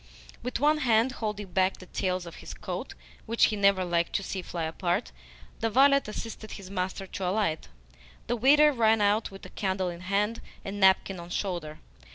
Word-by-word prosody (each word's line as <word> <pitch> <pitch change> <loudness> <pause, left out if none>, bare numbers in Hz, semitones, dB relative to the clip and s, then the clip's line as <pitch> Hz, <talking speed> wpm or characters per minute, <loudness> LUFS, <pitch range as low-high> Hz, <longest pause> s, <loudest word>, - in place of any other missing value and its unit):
With 250 0 -3
one 300 +2 +3
hand 235 -1 +3
holding 210 -5 -4
back 190 +1 +2
the 185 - -12
tails 185 0 -2
of 170 - -10
his - - -9
coat - - -6 0.3
(which 230 +1 +4
he - - 0
never 200 -2 +3
liked 170 -1 0
to 205 - 0
see 190 0 -4
fly 175 -2 -5
apart), 175 +5 -1 0.5
the 225 - 0
valet 275 +4 +5
assisted 215 0 -7
his 195 -2 -9
master 190 0 -3
to 190 0 -4
alight. 185 -6 0 0.6
The 240 - 0
waiter 295 +6 +6
ran 225 -3 +3
out 205 +2 +2
with 195 0 -12
candle 190 -2 -1
in 170 -1 -7
hand 200 +5 -1 0.2
and 200 +1 -5
napkin 190 -1 +4
on 170 0 -9
shoulder. 175 -5 -3
200 Hz, 185 wpm, -28 LUFS, 185-225 Hz, 0.6 s, waiter